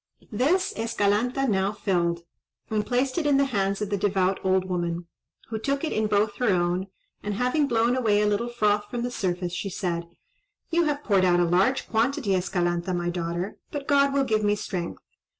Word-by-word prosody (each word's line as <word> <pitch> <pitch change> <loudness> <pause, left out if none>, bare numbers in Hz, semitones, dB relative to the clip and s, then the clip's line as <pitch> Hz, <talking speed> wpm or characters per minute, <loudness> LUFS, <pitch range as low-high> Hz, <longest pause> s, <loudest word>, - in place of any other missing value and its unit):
This 295 - +1
Escalanta 230 +4 0
now 195 -2 +1
filled, 175 -5 0 0.5
and 215 -1 +1
placed 255 +6 0
it 310 - -1
in 285 -1 +4
the 280 - +4
hands 200 -5 -1
of 205 - -5
the 200 - +1
devout 190 -1 +1
old 190 0 +2
woman, 175 -1 -2 0.4
who 220 -1 -3
took 275 +5 -1
it 320 - -1
in 215 0 +1
both 210 +1 +1
her 245 -3 +1
own, 180 0 +1 0.3
and, 205 -1 -3
having 250 +6 +1
blown 235 0 +2
away 220 -5 +2
a 210 - +2
little 210 +3 0
froth 210 -3 +1
from 240 +1 -3
the 245 - -2
surface, 180 -5 -2
she 195 +2 -3
said,— 170 -2 -3 0.6
"You 340 0 +3
have 295 -1 -1
poured 195 -3 +3
out 175 -1 +4
a 175 - +4
large 190 +10 +2
quantity, 235 0 0
Escalanta, 175 -1 0
my 175 0 -1
daughter; 175 +2 -3
but 285 -2 -6
God 280 -1 +4
will 275 0 +2
give 215 -4 0
me 205 0 +3
strength." 180 -4 -5
210 Hz, 195 wpm, -26 LUFS, 185-245 Hz, 0.6 s, in